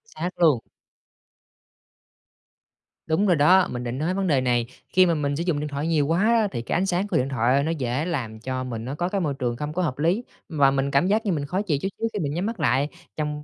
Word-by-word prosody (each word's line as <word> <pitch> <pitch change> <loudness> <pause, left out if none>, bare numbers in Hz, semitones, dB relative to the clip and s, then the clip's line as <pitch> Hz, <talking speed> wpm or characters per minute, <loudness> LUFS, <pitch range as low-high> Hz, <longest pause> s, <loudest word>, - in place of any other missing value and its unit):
Xác 180 - -3
luôn. 155 -8 +5 2.5
Đúng 160 +6 +2
rồi 180 - +4
đó, 180 +5 +5
mình 120 0 -4
định 120 +1 -4
nói 160 +6 -1
vấn 195 0 -1
đề 140 -6 +3
này. 120 -2 +1 0.3
Khi 185 0 +6
mà 170 - +2
mình 145 -2 -1
sử 165 - -2
dụng 170 -5 0
điện 150 - -3
thoại 145 +2 -3
nhiều 155 -4 +2
quá 165 +4 +1
á 225 -1 +3
thì 120 - -3
cái 115 - -3
ánh 180 - +2
sáng 190 +1 0
của - - 0
điện 130 +1 0
thoại 130 +2 +2
nó 160 - 0
dễ 135 -1 -2
làm 125 -11 -3
cho 130 +2 -3
mình 115 -3 -5
nó 135 +3 -4
có 175 +3 -1
cái 195 0 -1
môi 150 -5 0
trường 120 -2 -1
không 150 +3 -4
có 180 - -1
hợp 150 -8 -1
lý, 175 +10 +1 0.3
và 145 -5 +3
mình 135 0 0
cảm 140 +6 +3
giác 215 +3 +1
như 200 - +1
mình 150 -4 -1
khó 185 +7 -1
chịu 165 -9 0
chút - - -1
xíu 225 - 0
khi 210 - -2
mình 145 -4 -2
nhắm 175 +5 -2
mắt 225 -2 -4
lại, 140 -1 +2 0.3
trong 150 -1 -3
150 Hz, 260 wpm, -24 LUFS, 135-180 Hz, 2.5 s, Khi